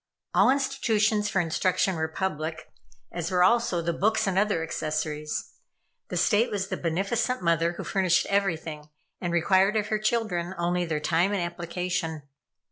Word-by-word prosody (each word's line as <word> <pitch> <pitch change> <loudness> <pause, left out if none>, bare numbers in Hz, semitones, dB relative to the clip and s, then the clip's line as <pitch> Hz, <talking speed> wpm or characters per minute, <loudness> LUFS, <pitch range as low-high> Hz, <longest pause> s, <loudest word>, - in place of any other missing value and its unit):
All - - +5
institutions 225 -6 +1
for 200 -2 +1
instruction 185 +3 +1
were 160 0 -1
public, 160 -2 -4 0.4
as 170 -1 -3
were, 180 -1 +3
also, 190 -4 +2
the 170 +1 0
books 215 +6 +1
and 195 -2 0
other 200 -4 +1
accessories. 155 -1 -3 0.5
The - - -4
State 225 +3 +3
was 195 -2 -3
the - - -1
beneficent 195 +7 -1
mother 170 0 +2
who - - -6
furnished 185 -3 +2
everything, 160 -6 -1 0.3
and 175 - -2
required 190 +4 +3
of 210 0 0
her 215 - 0
children 215 -5 -1
only 175 +1 0
their 155 -2 -2
time 170 +6 +1
and 195 - 0
application. 170 -2 -3
180 Hz, 155 wpm, -27 LUFS, 165-205 Hz, 0.5 s, All